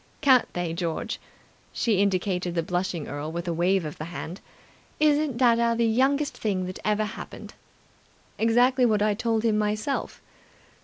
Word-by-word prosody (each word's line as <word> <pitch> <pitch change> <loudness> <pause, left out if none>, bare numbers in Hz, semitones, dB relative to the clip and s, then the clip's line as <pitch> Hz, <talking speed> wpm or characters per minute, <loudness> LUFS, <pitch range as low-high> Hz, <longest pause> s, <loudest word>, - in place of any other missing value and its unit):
Can't 260 -4 +4
they, 175 -2 -2
George?" 170 -1 -3 0.5
She 210 -5 +1
indicated 185 -2 0
the 165 - +1
blushing 175 -1 -2
earl 145 +2 -5
with 170 +2 -5
a 170 - 0
wave 175 +2 +1
of 150 - -7
the 155 - -4
hand. 170 +2 -7 0.6
"Isn't 300 -3 +2
dadda 235 -2 +3
the 235 - +2
youngest 270 +6 +1
thing 190 -4 -1
that 185 0 -6
ever 215 0 +1
happened?" - - -8 0.9
"Exactly 245 +3 +3
what 215 -3 +3
I 210 0 +2
told 225 +1 -1
him 215 -2 +2
myself." 215 +6 -2
210 Hz, 155 wpm, -26 LUFS, 180-235 Hz, 0.9 s, Can't